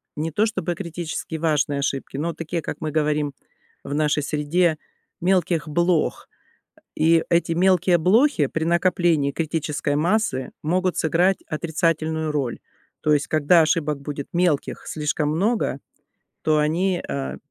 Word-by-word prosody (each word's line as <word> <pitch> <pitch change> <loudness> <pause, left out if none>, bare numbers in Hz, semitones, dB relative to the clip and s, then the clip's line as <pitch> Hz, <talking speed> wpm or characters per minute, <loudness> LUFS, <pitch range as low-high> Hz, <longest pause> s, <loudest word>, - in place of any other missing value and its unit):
не 160 +2 -3
то 205 +8 +2
чтобы 200 -5 -2
критически 170 -2 -5
важные 150 -3 0
ошибки, 135 -1 -3
но 165 +4 -2
такие, 165 +1 -4
как - - -5
мы 155 -2 -3
говорим 150 -1 0 0.5
в 140 - -5
нашей 150 0 +1
среде, 155 +3 +1 0.4
мелких 175 -3 +1
блох. 170 +1 0 0.5
Э, - - -24 0.2
и 165 +1 +4
эти 170 0 +2
мелкие 180 0 +3
блохи 195 - +3
при 160 +3 -2
накоплении 170 -4 +2
критической 155 -2 -2
массы 160 - 0
могут 180 +3 0
сыграть 175 +4 +2
отрицательную 160 -1 -1
роль, 135 -5 -2 0.4
то 150 - +3
есть 145 0 -1
когда 155 +2 +4
ошибок 155 -2 0
будет 140 0 -6
мелких 170 -5 0
слишком 150 -1 -1
много, 195 - 0 0.6
то 155 -1 +2
они, 175 +5 +1
э, 70 -1 -3
160 Hz, 135 wpm, -23 LUFS, 150-175 Hz, 0.6 s, и